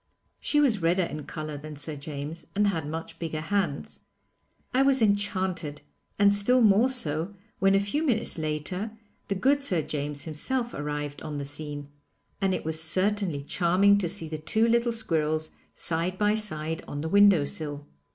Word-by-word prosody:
She 295 - +1
was 240 -10 +3
redder 175 +3 +3
in 150 -3 -5
colour 155 -1 -5
than 150 +1 -8
Sir 145 +2 -5
James, 145 +3 -7
and 205 +1 +3
had 165 -7 0
much 160 +1 -6
bigger 160 -2 -3
hands. 170 -3 -2 0.7
I 260 - +4
was 275 -1 +4
enchanted, 190 -7 0 0.3
and 200 0 +5
still 240 +5 +3
more 215 +4 +5
so 175 - 0 0.2
when 195 0 +4
a - - +5
few 200 +10 -1
minutes 230 - +2
later 180 +8 -3 0.3
the 200 - -1
good 275 +9 +3
Sir 180 - +1
James 145 -1 -4
himself 240 - -2
arrived 145 0 -4
on 155 -2 -5
the 140 - -4
scene, 145 0 -4 0.5
and 190 -1 +2
it - - -5
was 160 0 0
certainly 185 -2 0
charming 185 +6 +3
to 180 -4 0
see 180 -3 -3
the 155 0 -5
two 220 +9 +2
little 235 +1 +2
squirrels 155 -8 0 0.2
side 170 +3 -2
by 210 +1 +3
side 160 -7 -1
on 145 - -4
the 160 - -3
window 200 -5 +6
sill. 145 -1 -3
170 Hz, 170 wpm, -27 LUFS, 155-205 Hz, 0.7 s, window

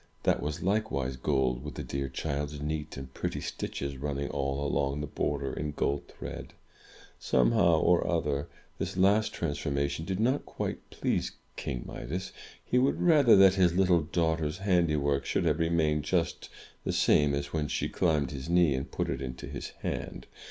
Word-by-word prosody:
That - - +2
was 75 0 -3
likewise 95 -10 0
gold, 65 -1 0
with 75 -4 -7
the - - -4
dear 70 0 -3
child's 75 +1 -3
neat 75 0 -4
and 65 -1 -8
pretty - - -3
stitches 70 -1 -4
running 70 +1 -3
all 70 0 -1
along 70 0 0
the 75 - -2
border, 70 - -2
in 75 -1 -3
gold 70 0 -1
thread! - - -8 0.7
Somehow 65 +6 +3
or 90 +1 +3
other, 75 -5 0 0.3
this - - -3
last 100 +3 +4
trans 75 -4 -3
formation 70 +2 -1
did 95 +2 -3
not 130 +5 +2
quite - - -5
please - - -1 0.2
King 60 -3 -4
Midas. 90 +9 -5 0.3
He 125 - +2
would 130 +2 +2
rather 150 -9 +6
that 95 -1 +7
his 90 -3 +3
little 90 -3 +4
daughter's 80 0 0
handiwork 75 -8 +2
should - - 0
have 80 0 +2
remained 80 -2 +2
just 85 +1 -1 0.3
the - - -1
same 75 -1 +4
as 70 0 -4
when 75 -2 0
she - - -1
climbed 75 -6 +1
his 70 +2 -6
knee 85 -4 +4
and 65 +1 -3
put - - -2
it 65 - -3
into 65 -1 -5
his - - -6
hand. - - -4
75 Hz, 175 wpm, -29 LUFS, 70-85 Hz, 0.7 s, that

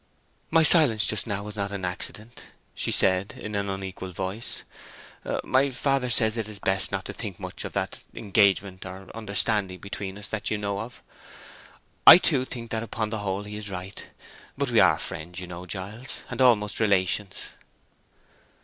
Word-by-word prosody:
"My 160 0 +4
silence 140 - +7
just 110 +2 0
now 100 -2 -3
was 105 0 -8
not 100 -1 -3
accident," 100 +4 -6 0.3
she - - -1
said, 95 +1 +3
in 105 - -7
an 100 -1 -2
unequal 95 -1 -6
voice. 95 +6 -4 0.8
"My 135 +2 +2
father 135 0 0
says 115 -2 +3
it 110 -2 -3
is 105 - -7
best 95 -1 0
not - - -3
to - - -6
think - - -6
too - - -14
much - - -5
of - - -7
that—engagement, 100 -1 0
or 95 +1 -10
understanding 100 -3 +1
between 100 +1 -7
us, 105 +1 -2
that 110 - -2
you 110 - -1
know 100 -1 -3
of. 115 +4 -8 1.0
I, - - +13
too, 140 -7 +2
think 115 -3 -8
that 110 - -1
upon 110 -1 -3
the 110 - -2
whole 100 0 -3
he 105 0 -8
is 105 -1 -2
right. 95 0 -7 0.5
But - - -1
we - - +4
are - - +5
friends, 85 +3 -6
you 90 - -6
know, 90 +1 -9
Giles, 105 +8 -6
and - - -3
almost 105 -5 +3
relations." 100 -1 +1
105 Hz, 175 wpm, -26 LUFS, 95-110 Hz, 1.0 s, I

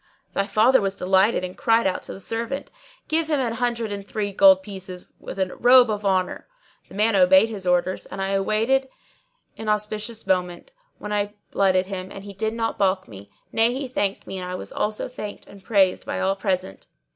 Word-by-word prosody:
Thy 200 - 0
father 235 +4 +4
was 195 -1 -1
delighted 190 +2 +2
and 185 0 -5
cried 230 0 +2
out 190 - 0
to - - -9
the - - -10
servant, 230 +7 -4 0.4
'Give 320 0 0
him 300 -3 +1
an 240 -3 -1
hundred 235 -2 -1
and 200 -1 -5
three 205 0 -3
gold 190 -1 +6
pieces 190 -2 -8
with - - -8
a 190 -1 -1
robe 245 -1 +6
of 210 -1 -3
honour!' 185 -2 0 0.4
The - - -12
man 215 +1 +2
obeyed 190 +3 +6
his 200 -4 -6
orders, 180 +1 +1
and - - -8
I 195 0 -1
awaited 220 +7 +1 0.7
an 220 - -4
auspicious 210 +2 -2
moment, 180 - -1 0.3
when 210 0 -5
I 205 0 -1 0.2
blooded 190 -1 +2
him; 190 -1 -6
and 195 - -9
he 200 0 -9
did 220 +3 -2
not 225 -1 -2
baulk 190 -1 +1
me; 100 -2 -12 0.2
nay 230 +2 +3
he 270 0 -3
thanked 205 -5 -2
me 190 - -6
and 180 0 -5
I 180 - -4
was - - -7
also 210 0 -2
thanked 210 -5 -8
and 200 -1 -15
praised 195 -4 +2
by - - -4
all 190 +1 +1
present. 185 - -3
200 Hz, 205 wpm, -23 LUFS, 190-225 Hz, 0.7 s, gold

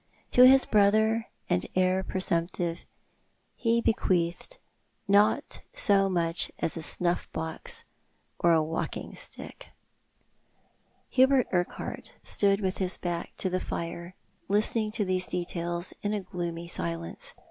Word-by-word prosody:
To 250 +1 +8
his 265 0 +6
brother 220 +2 +3 0.2
and 90 - +1
heir 185 0 +3
presumptive 170 -2 -1 0.7
he 230 0 +1
bequeathed 180 - 0 0.5
not 200 +1 +3
so 200 - +5
much 170 -1 +1
as - - -1
a 165 - -4
snuff 175 +2 -1
box 160 0 -4 0.6
or 170 - +4
a 160 -1 +4
walking 160 +1 -4
stick. - - -9 1.4
Hubert 265 0 +4
Urquhart 175 -1 -3
stood 200 0 +2
with 190 -1 -2
his 185 -1 -1
back 175 -1 -4
to - - -1
the 185 0 0
fire, 170 +1 -5 0.3
listening 215 +2 +2
to 210 - 0
these 185 -1 0
details 175 0 -2
in 210 +1 -1
a 205 - -2
gloomy 170 -2 -5
silence. 85 - -4
185 Hz, 125 wpm, -28 LUFS, 170-205 Hz, 1.4 s, To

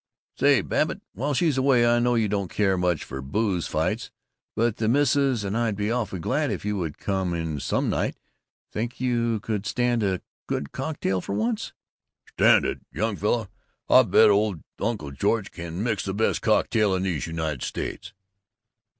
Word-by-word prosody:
"Say, - - +4
Babbitt, - - -1
while 140 +7 -1
she's 150 -3 +2
away 130 -3 +4
I 120 0 +4
know 120 0 +2
you 110 -2 +2
don't 100 -3 -2
care 95 -2 +1
much 90 -3 0
for 65 0 -6
booze 95 +5 -1
fights, - - -1 0.5
but 115 -1 +1
the 110 - 0
Missus 135 -3 +2
and 100 +1 -2
I'd 115 -3 0
be 105 +2 -1
awfully 105 -6 -2
glad 140 - 0
if - - -4
you 105 -1 -1
could 80 -4 -4
come 95 -3 -1
in 80 -3 -3
some - - 0
night. - - -1 0.5
Think 115 +3 -4
you 120 -3 0
could 105 -2 -3
stand 120 +1 +1
a 95 -3 0 0.3
good 70 - -3
cocktail 130 -10 -2
for 100 - -5
once?" 110 +1 -1 0.6
"Stand - - +4
it? - - -2
Young 105 - -1
fella, 110 +2 0 0.4
I - - +9
bet - - +5
old 100 -5 +1 0.2
Uncle 105 -12 -2
George 100 +8 0
can 85 +3 -5
mix 110 -5 0
the 95 0 -3
best 110 +2 +1
cocktail 105 -2 +2
in 95 - -1
these 90 -6 -1
United 80 -5 -3
States!" - - -4
105 Hz, 175 wpm, -25 LUFS, 95-120 Hz, 0.6 s, I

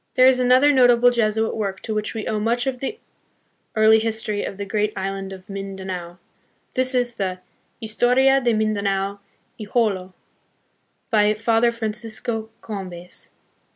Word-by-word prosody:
There 255 - +6
is 260 -1 +5
another 255 +3 +5
notable 245 -2 +5
Jesuit 220 -2 +1
work 195 -3 -3
to 220 - -4
which 215 +1 -3
we 220 - -4
owe 215 - -1
much 235 +3 0
of 260 -2 -2
the 275 - -4 0.8
early 220 0 +6
history 220 -2 -2
of 195 - -5
the 200 - -4
great 210 +1 0
island 195 0 -4
of 190 0 -10
Mindanao: 190 -3 -6 0.6
this 255 0 0
is 245 -1 +1
the 190 -4 -3 0.4
Historia 250 +4 +3
de 240 -2 +2
Mindanao 200 -2 0 0.4
y 215 - -6
Jolo, 195 -6 0 1.0
by 210 -1 +4
Father 225 +2 +2
Fran 225 -2 -3
cisco 225 0 -4
Combes. 185 -4 -7
220 Hz, 150 wpm, -22 LUFS, 195-240 Hz, 1.0 s, There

